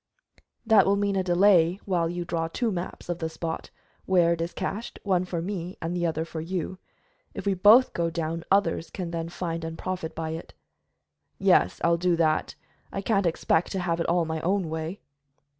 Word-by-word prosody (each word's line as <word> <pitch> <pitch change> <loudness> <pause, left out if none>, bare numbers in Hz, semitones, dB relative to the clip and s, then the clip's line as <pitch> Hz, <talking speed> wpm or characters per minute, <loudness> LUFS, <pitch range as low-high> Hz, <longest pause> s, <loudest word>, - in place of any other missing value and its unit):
"That 220 -4 +5
will 200 - +4
mean 200 0 0
a 190 - +2
delay 180 -1 +4
while 175 -4 +1
you 175 0 -4
draw 165 -1 -1
two 225 +7 -1
maps 180 -1 -5
of 175 -1 -3
the 160 - -2
spot 160 0 -5 0.4
where 175 -3 +4
it 165 - -3
is 170 +1 -2
cached, 220 +4 -4
one 185 -3 +1
for 170 -2 -3
me 180 -1 -5
and 165 +1 -3
the 175 -1 +1
other 160 0 -2
for 165 -1 -6
you. 185 +2 -4 0.6
If - - -6
we 200 - +2
both 210 +7 +6
go 170 -1 0
down, 165 0 -3
others 180 -4 +2
can 175 -3 -5
then 165 0 -3
find 165 -1 -4
and 165 0 -5
profit 185 -3 -4
by 160 -1 -3
it." 160 +1 -7 0.8
"Yes, 90 - +3
I'll 170 0 +4
do 175 0 +2
that. 155 -2 +1 0.4
I 195 - -4
can't 200 -3 +2
expect 165 0 +1
to 190 - -1
have 170 -2 -1
it 165 - -1
all 170 0 +2
my 160 0 -3
own 185 -1 0
way." 160 +4 -4
175 Hz, 200 wpm, -26 LUFS, 165-190 Hz, 0.8 s, both